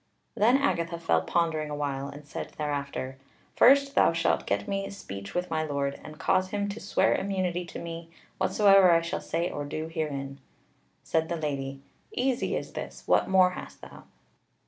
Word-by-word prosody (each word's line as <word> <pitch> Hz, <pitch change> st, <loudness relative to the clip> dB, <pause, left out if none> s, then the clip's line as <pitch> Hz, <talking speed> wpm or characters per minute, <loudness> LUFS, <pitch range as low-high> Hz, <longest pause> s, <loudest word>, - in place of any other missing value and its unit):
Then 240 Hz, +5 st, +4 dB
Agatha 170 Hz, -12 st, 0 dB
fell 85 Hz, -, +2 dB
pondering 155 Hz, -, 0 dB
a 150 Hz, -, -3 dB
while, 140 Hz, -2 st, -2 dB
and 145 Hz, +1 st, -10 dB
said 145 Hz, -, -7 dB
thereafter: 140 Hz, -3 st, -3 dB, 0.4 s
"First, 275 Hz, +2 st, +6 dB
thou -, -, +4 dB
shalt 165 Hz, 0 st, +1 dB
get -, -, -1 dB
me 195 Hz, -1 st, -2 dB
speech 100 Hz, -, -8 dB
with 180 Hz, -1 st, -2 dB
my 160 Hz, -1 st, +1 dB
Lord, 140 Hz, -2 st, -2 dB
and 155 Hz, 0 st, -10 dB
cause 185 Hz, +2 st, +1 dB
him 205 Hz, +1 st, -1 dB
to 205 Hz, +3 st, -5 dB
swear 200 Hz, -, +2 dB
immunity 185 Hz, -3 st, -1 dB
to -, -, -8 dB
me, 165 Hz, 0 st, -7 dB, 0.3 s
whatsoever 195 Hz, 0 st, +6 dB
I 165 Hz, -1 st, +5 dB
shall 170 Hz, -, -3 dB
say 170 Hz, +2 st, -2 dB
or 145 Hz, -, -4 dB
do 155 Hz, +2 st, -4 dB
herein." 140 Hz, -3 st, -3 dB, 0.6 s
Said 160 Hz, 0 st, 0 dB
the 170 Hz, -, -1 dB
Lady: 135 Hz, -3 st, -3 dB, 0.3 s
"Easy 255 Hz, 0 st, 0 dB
is -, -, -5 dB
this. -, -, -7 dB
What -, -, +3 dB
more 185 Hz, -1 st, +5 dB
hast -, -, -9 dB
thou?" -, -, -12 dB
165 Hz, 175 wpm, -28 LUFS, 145-190 Hz, 0.6 s, First